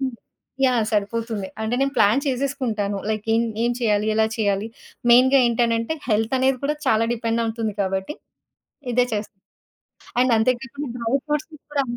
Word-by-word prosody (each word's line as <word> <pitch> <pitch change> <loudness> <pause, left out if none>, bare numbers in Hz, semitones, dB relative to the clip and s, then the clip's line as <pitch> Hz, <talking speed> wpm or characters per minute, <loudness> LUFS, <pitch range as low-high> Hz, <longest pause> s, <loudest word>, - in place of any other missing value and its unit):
హ్మ్. 265 -1 -1 0.5
యాహ్! 245 -4 +3
సరిపోతుంది. 215 -1 -1
అంటే 220 +2 -1
నేను 275 0 +1
ప్లాన్ 215 +7 +4
చేసేసుకుంటాను. 245 -7 -1
లైక్ 215 0 -3
ఏం 230 - +3 0.2
ఏం 240 - +2
చేయాలి? 210 -3 +1
ఎలా 220 0 +3
చేయాలి? 205 0 0 0.4
మెయిన్‌గా 260 +3 +6
ఏంటనంటే 230 +4 +1
హెల్త్ 220 +2 +1
అనేది 260 0 +2
కూడా 300 +2 0
చాలా 225 -2 +3
డిపెండ్ 230 0 -1
అవుతుంది 225 -2 -3
కాబట్టి 190 +7 -2 0.8
ఇదే 245 +1 +3
చేస్తాను. 205 -2 -6 0.8
అండ్ 255 -1 +3
అంతే 220 +3 +3
కాకుండా 280 +2 -6
డ్రై 230 +1 -1
ఫ్రూట్స్‌కి 305 +1 -3
కూడా 290 -1 +1
230 Hz, 150 wpm, -22 LUFS, 215-260 Hz, 0.8 s, మెయిన్‌గా